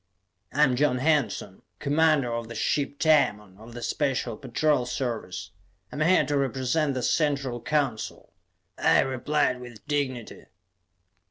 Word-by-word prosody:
"I 150 Hz, -, +3 dB
am 130 Hz, -4 st, +3 dB
John 130 Hz, -1 st, +2 dB
Hanson, 130 Hz, -9 st, 0 dB, 0.2 s
commander 145 Hz, -4 st, +2 dB
of 115 Hz, -1 st, -3 dB
the 115 Hz, -, -8 dB
ship 140 Hz, +5 st, -1 dB
Tamon 105 Hz, -, +2 dB
of 115 Hz, +2 st, -12 dB
the 120 Hz, -, -6 dB
Special 130 Hz, -5 st, -1 dB
Patrol 135 Hz, +1 st, 0 dB
Service. 110 Hz, -8 st, -4 dB, 0.4 s
I -, -, -7 dB
am -, -, -3 dB
here 165 Hz, -1 st, +4 dB
to 145 Hz, +1 st, 0 dB
represent 135 Hz, +2 st, 0 dB
the 130 Hz, -, -2 dB
Central 140 Hz, -6 st, 0 dB
Council," 140 Hz, -5 st, -2 dB, 0.5 s
I -, -, +5 dB
replied 130 Hz, 0 st, 0 dB
with 120 Hz, -4 st, -11 dB
dignity. 135 Hz, -5 st, -3 dB
130 Hz, 140 wpm, -26 LUFS, 120-145 Hz, 0.5 s, I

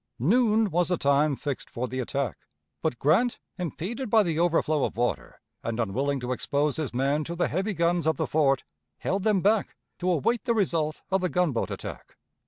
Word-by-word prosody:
Noon 215 Hz, -, +3 dB
was 175 Hz, +1 st, +2 dB
the 180 Hz, -, +1 dB
time 140 Hz, +1 st, +3 dB
fixed 140 Hz, 0 st, -4 dB
for 125 Hz, +2 st, -3 dB
the 130 Hz, +1 st, -4 dB
attack; 130 Hz, -1 st, -2 dB, 0.4 s
but 120 Hz, -, -1 dB
Grant, 180 Hz, -, +3 dB, 0.2 s
impeded 190 Hz, -, -4 dB
by 220 Hz, 0 st, +5 dB
the 165 Hz, -4 st, -1 dB
overflow 160 Hz, -3 st, +2 dB
of -, -, -2 dB
water, 100 Hz, -, -2 dB, 0.2 s
and 115 Hz, 0 st, -3 dB
unwilling 135 Hz, +6 st, 0 dB
to 125 Hz, +1 st, -3 dB
expose 145 Hz, +3 st, 0 dB
his 155 Hz, -5 st, -2 dB
men 140 Hz, +4 st, +1 dB
to 170 Hz, +3 st, -5 dB
the 175 Hz, -, +1 dB
heavy 195 Hz, +5 st, -1 dB
guns 170 Hz, 0 st, +1 dB
of 160 Hz, -, +2 dB
the 160 Hz, -, 0 dB
fort, 140 Hz, -5 st, +2 dB, 0.3 s
held 195 Hz, +1 st, -1 dB
them 205 Hz, -2 st, +2 dB
back 210 Hz, +2 st, +2 dB, 0.2 s
to 180 Hz, +1 st, 0 dB
await 215 Hz, -, +1 dB
the 235 Hz, -2 st, +2 dB
result 165 Hz, -7 st, 0 dB
of 190 Hz, 0 st, +2 dB
the 180 Hz, -, 0 dB
gunboat 170 Hz, -10 st, 0 dB
attack. -, -, -8 dB
160 Hz, 190 wpm, -27 LUFS, 140-185 Hz, 0.4 s, by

